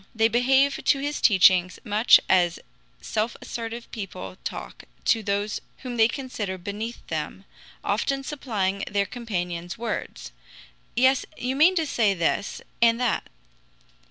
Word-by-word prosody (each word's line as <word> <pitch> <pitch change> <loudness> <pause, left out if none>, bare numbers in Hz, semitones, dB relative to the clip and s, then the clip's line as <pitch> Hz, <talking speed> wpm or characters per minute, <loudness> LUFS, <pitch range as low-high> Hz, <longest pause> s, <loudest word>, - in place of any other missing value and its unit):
They 225 0 +4
behave 265 +4 +3
to 280 - +4
his 290 +2 -3
teaching 185 -3 +6
much 215 +1 +6
as 175 -2 +3 0.4
self 220 +2 -2
assertive 230 0 -6
people 195 -4 -7
talk - - -7 0.2
to 225 - +3
those 205 0 -2 0.2
whom 250 -2 -5
they 225 -1 +5
consider 230 -7 -4
beneath 210 +6 -6
them, 160 +4 -5 0.4
often 275 0 0
supplying 205 -9 -2
their 200 -1 +1
companions' 180 -7 -4
words: 230 -1 -5 0.6
"Yes, 260 +1 +4
you 255 +2 -2
mean 330 +7 +5
to 325 -3 +1
say 220 -8 +2
this 170 +3 -1 0.2
and 230 0 +5
that." 245 -3 0
225 Hz, 130 wpm, -25 LUFS, 195-250 Hz, 0.6 s, teaching